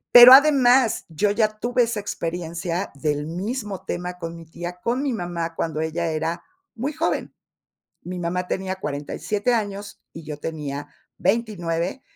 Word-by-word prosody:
Pero 245 +1 +13
además, 265 -4 +6
yo 165 +6 +1
ya 215 0 +1
tuve 245 0 +2
esa 230 -2 -1
experiencia 170 -1 -3
del 150 +1 -1
mismo 200 +3 -4
tema 180 0 -4
con 165 -1 -6
mi 165 -1 -11
tía, 175 +2 -7
con 250 +4 0
mi 275 - 0
mamá, 175 -4 -3
cuando 160 -1 -2
ella 165 +2 -1
era 160 +1 -2 0.3
muy 265 +6 -3
joven. 320 +2 -1 0.7
Mi 180 0 -5
mamá 180 +1 -2
tenía 190 0 -2
47 190 - -2
años 205 -2 -3
y 165 - -9
yo 150 -1 -6
tenía 145 -2 -5 0.3
29 190 -1 -1
180 Hz, 150 wpm, -23 LUFS, 165-225 Hz, 0.7 s, Pero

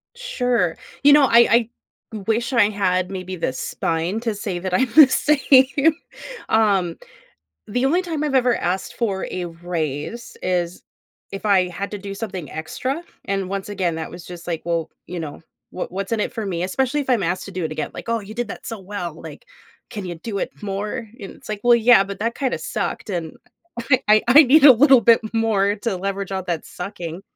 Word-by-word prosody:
Sure, 250 - 0 0.3
you 285 - +7
know, 295 -1 +7
I 235 0 +5 0.4
I 220 - -4
wish 235 +3 0
I 215 -4 +4
had 185 -3 0
maybe 185 -1 -5
the 165 - -2
spine 165 - -2
to 225 -3 -2
say 200 -4 -4
that 185 0 -4
I'm 250 +2 +2
the 305 -4 +9
same. 275 +2 +4 0.5
Um, 195 -6 +2 0.7
the 245 +5 -1
only 345 +6 +2
time 320 -4 -3
I've 280 -2 -1
ever 250 -2 +3
asked 185 +2 -2
for 200 -5 -1
a 180 -1 -3
raise 170 - -5
is 180 -1 -1 0.5
if 195 +2 -6
I 185 -3 +3
had 195 +3 -5
to 205 - -4
do 200 0 -7
something 195 -6 -6
extra, 255 - -4 0.2
and 195 -1 -2
once 195 +1 -4
again, 185 -5 -1
that 160 0 -5
was 175 0 -10
just 175 -1 -10
like, 165 -2 -3
well, 170 -2 -2 0.2
you 175 -1 -5
know, 155 0 -7 0.3
wha 185 - -4
what's 195 +3 -4
in 225 - +1
it - - -2
for 220 - -4
me? 180 -3 -2
Especially 265 +9 0
if 270 -2 -3
I'm 230 -6 +2
asked 180 +2 -1
to 195 - -9
do 185 -2 -3
it 160 - -3
again. - - -4
Like, - - -9
"Oh, 230 0 +1
you 210 +2 -10
did 240 -2 -3
that - - -8
so 225 -3 -6
well," 185 -4 -5
like, 335 - -11 0.4
"Can 205 -4 -6
you 175 -1 -5
do 200 +4 -5
it - - -2
more?" 210 +4 -4
And 195 - -7
it's - - -16
like, 210 -1 -4
"Well, 240 0 +6
yeah, 235 -3 +6
but 200 0 -7
that 230 +2 -1
kinda 270 -2 -2
sucked, 210 - -4
and 170 -4 -4 0.7
I 215 0 +6
I 285 +6 +9
need 285 +3 +5
a 275 - +11
little 265 +1 +6
bit 230 +2 +6
more 210 -3 +1
to 210 -2 -2
leverage 195 +1 -4
out 190 -1 -3
that 165 -2 -2
sucking." 180 -1 -7
200 Hz, 205 wpm, -21 LUFS, 180-235 Hz, 0.7 s, a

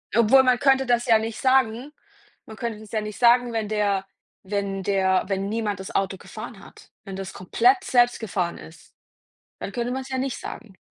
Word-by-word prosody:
Obwohl, 235 +4 +6
man 255 -1 +3
könnte 270 -1 +3
das 240 0 +1
ja 225 -3 +5
nicht 225 0 -5
sagen. 260 0 +2 0.5
Man 220 - -10
könnte 225 -2 -4
das 215 -1 -13
ja 215 -1 -1
nicht 210 -1 -7
sagen, 240 0 +5
wenn 220 -2 -1
der 205 -2 0 0.4
wenn 195 0 -3
der 190 -2 +2
wenn 195 0 -2
niemand 210 -3 -2
das 190 - -8
Auto 190 -1 -1
gefahren 215 0 -10
hat. - - -16
Wenn 195 -2 -8
das 190 0 -6
komplett 375 - +2
selbst 245 -5 +3
gefahren 180 -5 -2
ist, 160 - -14 0.7
dann - - -5
könnte 245 0 -2
man's 265 0 -4
ja 260 -1 -3
nicht 265 -1 -2
sagen. 200 -5 -9
220 Hz, 195 wpm, -24 LUFS, 195-245 Hz, 0.7 s, Obwohl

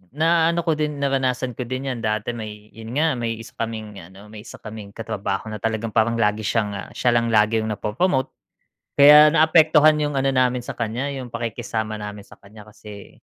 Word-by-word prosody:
na-ano 165 +1 +2
ko 165 - +1
din 150 -1 -1
naranasan 130 -2 0
ko 125 - -4
din 130 +1 -3
yan 120 - -5
dati 110 0 -2
may 105 -2 -9
yun 115 +3 -9
nga, 155 -4 +1
may 115 -1 -2
isa 115 +1 -11
kaming 110 -3 -5
ano, 95 +5 -14
may 110 0 -11
isa - - -10
kaming 105 -2 -9
katrabaho 105 -1 -4
na 105 - -6
talagang 115 0 -2
parang 115 +2 +1
lagi 105 -2 +1
siya 105 -2 -2
siya 125 - +1
lang 115 0 +1 0.2
yung 110 -1 0
na-popromote 130 - -1 0.7
kaya 150 +1 +9
na-apektuhan 155 -1 +5
yung 145 -2 -1
ano 135 0 0
namin 125 0 +2
sa - - -5
kanya 120 +5 -3
yung 130 -3 -7
pakikisama 115 -1 -4
namin 105 -1 -8
sa - - -15
kanya 105 +1 -15
kasi, 105 -1 -13
115 Hz, 185 wpm, -22 LUFS, 105-135 Hz, 0.7 s, kaya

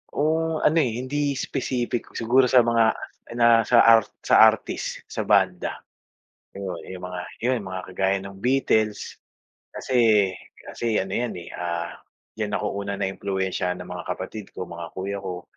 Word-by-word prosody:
O 160 +2 +1
ano 160 +2 +4
eh, 125 -5 0
hindi 140 +1 -1
specific. 125 -3 -2
Siguro 125 +2 +3
sa 125 -2 +6
mga, 115 -1 +4 0.5
na 115 -1 +6
sa 115 +1 +5
art 115 -2 +6 0.2
sa - - +6
artist, - - -5
sa - - -4
banda. - - +1 0.7
'Yon, 95 -3 -6
'yong 90 -1 -7
mga 90 -1 -5 0.2
'yon 125 -2 0
mga 95 -1 -5
kagaya 95 +1 +1
ng 100 0 -9
Beatles. 115 -5 +1 0.6
Kasi 110 -6 +3 0.3
kasi 115 -2 -3
ano 95 - -9
'yan 120 -1 -2
eh, 85 -1 -8
ah, 85 -1 -4 0.4
diyan 105 -1 -1
ako - - -2
una 100 0 -3
na 95 - -1
impluwensyahan 95 -2 -2
ng - - -13
mga - - -6
kapatid 105 -2 -7
ko, - - -4
mga 85 -1 -7
kuya 100 +1 -3
ko. 90 -2 -6
110 Hz, 160 wpm, -24 LUFS, 95-125 Hz, 0.7 s, sa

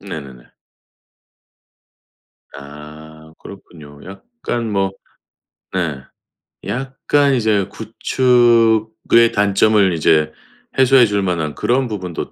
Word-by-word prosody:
네 95 -6 -7
네네. 65 -3 -14 2.1
아. 75 +2 -13
그렇군요. 75 -7 -14
약간 115 - -6
뭐 95 -1 -1 0.8
네 85 -7 -3 0.7
약간 135 +2 0
이제 110 -5 +1
구축의 115 -1 +2
단점을 100 -1 +2
이제 80 -1 +1 0.5
해소해 130 -1 +5
줄 100 -1 -1
만한 80 -5 -2
그런 125 +1 0
부분도 90 -6 -6
100 Hz, 170 characters per minute, -17 LUFS, 80-115 Hz, 2.1 s, 해소해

